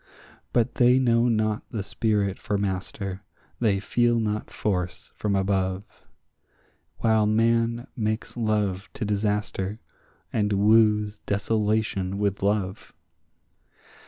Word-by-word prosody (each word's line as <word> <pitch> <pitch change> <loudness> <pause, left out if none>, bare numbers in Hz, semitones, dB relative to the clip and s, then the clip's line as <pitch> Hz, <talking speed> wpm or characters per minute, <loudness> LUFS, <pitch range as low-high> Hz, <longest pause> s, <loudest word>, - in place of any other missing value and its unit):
But 120 +1 +1
they 125 +1 +5
know 120 -2 +3
not 110 -1 +1
the 105 -3 -3
spirit 100 -1 0
for 105 -3 -1
master, 95 0 -3 0.4
they 105 -4 +2
feel 120 +3 +2
not 105 -1 -2
force 90 -4 -3
from 105 -2 -1
above, 95 -1 0 1.1
While 110 -2 +3
man 115 +2 +2
makes 110 0 -2
love 105 -4 -1
to 130 -5 -4
disaster, 105 0 -1 0.5
and 105 -1 +1
woos 105 0 +3
desolation 105 -2 0
with 100 -1 -1
love. 100 -1 -1
105 Hz, 105 wpm, -25 LUFS, 100-110 Hz, 1.1 s, they